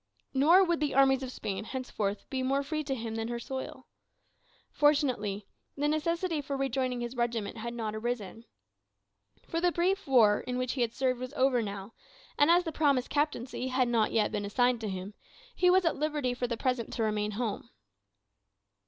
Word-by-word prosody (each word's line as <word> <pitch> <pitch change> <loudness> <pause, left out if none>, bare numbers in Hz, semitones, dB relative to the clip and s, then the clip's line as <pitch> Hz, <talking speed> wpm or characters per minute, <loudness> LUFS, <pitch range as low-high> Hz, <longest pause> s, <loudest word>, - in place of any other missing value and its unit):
Nor 320 +8 +6
would 340 -2 +1
the 295 -3 -1
armies 270 -1 +5
of 260 -1 -5
Spain 205 -4 -4
henceforth 215 -5 -3
be 265 -1 -1
more 275 +2 +1
free 305 +2 -3
to 270 -1 -1
him 225 -2 -5
than 225 0 -3
her 240 0 -3
soil. 260 +2 -6 0.9
Fortunately, 255 -9 +1 0.3
the 290 +1 +1
necessity 330 +2 0
for 280 0 -4
rejoining 260 -2 -1
his 240 +1 -4
regiment 235 -3 -2
had 235 +2 -5
not 220 -2 -3
arisen. 225 -1 -4 1.0
For 330 - -2
the 355 0 +3
brief 370 +2 0
war 225 -6 +5
in 250 0 -4
which 255 -1 -1
he 245 -3 +1
served 255 +1 -1
was 255 +2 -6
over 260 -3 +2
now; 200 0 -6 0.4
and 290 - +4
as 350 +1 +5
the 325 - -3
promised 280 -5 +1
captaincy 285 -4 -1
had 255 -1 +1
not 230 -2 +2
yet 215 -2 +2
been 205 - -2
assigned 245 +3 +1
to 215 - -3
him, 190 +2 -5 0.4
he 360 - +4
was 370 0 +4
at 330 - +1
liberty 295 -4 -1
for 245 0 -2
the 235 -1 -3
present 250 -3 -1
to 230 - -1
remain 210 -1 -1
at - - -6
home. 230 -4 -3
255 Hz, 190 wpm, -30 LUFS, 225-290 Hz, 1.0 s, Nor